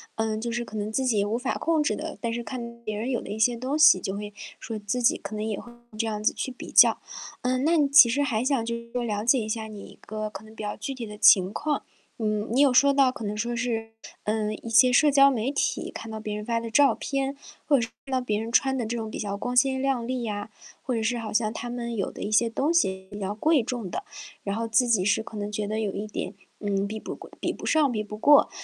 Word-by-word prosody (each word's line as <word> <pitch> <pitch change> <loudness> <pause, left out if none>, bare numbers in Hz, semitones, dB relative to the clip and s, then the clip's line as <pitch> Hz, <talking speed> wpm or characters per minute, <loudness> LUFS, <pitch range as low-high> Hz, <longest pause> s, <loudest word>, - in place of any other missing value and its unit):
嗯， 220 -1 -1
就 235 +1 -3
是 240 +1 -2
可 220 -2 -8
能 210 +1 -3
自 265 +4 0
己 220 -6 +2
无 210 +2 -1
法 255 +2 -2
控 325 -1 +1
制 295 - +1
的。 315 0 -6
但 235 - -1
是 235 +1 -3
看 235 -2 -7
别 215 -1 -3
人 225 +5 -3
有 245 -3 0
的 - - -10
一 215 - -5
些 235 +2 +3
东 260 +5 -2
西， 310 -11 +7
就 190 +2 -4
会 205 0 -6 0.3
说 225 -1 -5
自 210 +4 -2
己 235 - +3
可 215 - -7
能 210 - -3
也 215 -2 -2
会 240 - -12 0.3
这 225 - 0
样 210 -1 -3
子 - - +4
去 260 - -4
比 250 - -10
较。 - - +6 0.4
嗯， 255 +2 0
那 335 +2 +4
你 290 -2 +3
其 280 -3 +9
实 255 +5 0
还 235 -6 0
想 265 -4 +1
就 235 +1 -2
是 235 0 -10
了 210 -2 -2
解 250 +2 +4
一 220 -1 -4
下 220 0 -2
你 215 -1 -9
一 - - -12
个 215 0 -5
可 215 - -9
能 220 0 -15
比 215 - -7
较 210 - -4
具 270 +6 -4
体 250 -3 -6
的 210 0 -9
情 190 -2 +6
况。 295 +6 -2 0.4
嗯， 215 0 -1
你 255 +4 +3
有 280 -2 +6
说 280 +2 +5
到 275 -2 +4
可 240 - -8
能 210 0 -3
说 235 +3 -2
是， 225 -2 -2 0.3
呃， 215 0 -1
一 230 - -8
些 250 +2 +6
社 300 +4 +6
交 275 0 +6
媒 245 +1 -1
体 285 - -1
看 225 - -8
到 220 - -5
别 215 -1 -4
人 210 0 -5
发 230 0 0
的 230 0 -6
照 280 +4 +5
片， 275 0 -2 0.3
或 285 - +4
者 - - +1
是 225 - -3 0.2
看 270 - -10
到 260 - +2
别 215 -4 -1
人 225 +1 -5
穿 265 +2 +3
的 240 - -2
这 230 +2 -3
种 220 -1 -4
比 - - -6
较 200 -1 -3
光 245 +4 -3
鲜 265 0 +3
亮 265 -3 0
丽 255 -1 -2
呀， 205 -2 -4 0.3
或 255 - -2
者 225 - 0
是 230 +2 0
好 225 -2 -5
像 215 0 +1
他 240 +2 -6
们 235 -1 -4
有 195 - -2
的 - - -10
一 205 - -3
些 230 +2 +3
东 275 +8 0
西 190 - +1
比 205 - -7
较 195 0 -2
贵 290 +5 +2
重 235 -4 -4
的。 - - -4 0.4
然 200 0 -2
后 230 +1 -2
自 225 +3 +3
己 220 -6 +3
是 205 +3 +2
可 220 - -11
能 205 0 -3
觉 210 0 -2
得 215 +2 -2
有 210 -3 -2
一 205 - -4
点， 210 - -5 0.3
嗯， 200 -1 -1
比 215 +2 -5
不 - - -6
贵 - - -13
比 - - -1
不 - - -9
上、 310 -3 +3
比 215 -4 -2
不 210 0 -8
过。 290 +6 +6
230 Hz, 305 characters per minute, -26 LUFS, 215-255 Hz, 0.4 s, 其